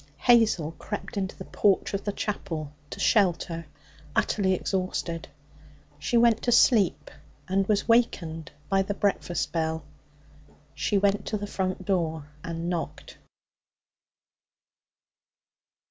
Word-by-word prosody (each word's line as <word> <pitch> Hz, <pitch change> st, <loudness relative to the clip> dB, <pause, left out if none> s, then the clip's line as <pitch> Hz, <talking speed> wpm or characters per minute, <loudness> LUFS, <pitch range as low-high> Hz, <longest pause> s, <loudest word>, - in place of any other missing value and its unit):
Hazel 225 Hz, -10 st, +4 dB
crept 210 Hz, +2 st, -5 dB
into 190 Hz, -2 st, -2 dB
the 190 Hz, -, -8 dB
porch 200 Hz, -1 st, +2 dB
of 200 Hz, -, -2 dB
the 205 Hz, -, 0 dB
chapel 165 Hz, -8 st, -4 dB, 0.2 s
to -, -, -8 dB
shelter, 170 Hz, -5 st, +2 dB, 0.5 s
utterly 190 Hz, -3 st, +2 dB
exhausted. 185 Hz, -3 st, -2 dB, 0.7 s
She 235 Hz, +11 st, +1 dB
went 230 Hz, -1 st, +4 dB
to 240 Hz, -, +1 dB
sleep, 225 Hz, -5 st, +4 dB, 0.4 s
and 195 Hz, +1 st, +1 dB
was 205 Hz, -1 st, +2 dB
awakened 165 Hz, -, +1 dB, 0.2 s
by 195 Hz, 0 st, +3 dB
the 200 Hz, +1 st, -2 dB
breakfast 195 Hz, -4 st, -1 dB
bell. 160 Hz, -1 st, -1 dB, 0.9 s
She 200 Hz, +8 st, 0 dB
went 200 Hz, 0 st, +1 dB
to 215 Hz, -, -1 dB
the 205 Hz, -, -4 dB
front 185 Hz, -2 st, -3 dB
door 160 Hz, -6 st, -1 dB
and 165 Hz, 0 st, -4 dB
knocked. 175 Hz, -2 st, -4 dB
190 Hz, 115 wpm, -27 LUFS, 165-205 Hz, 0.9 s, Hazel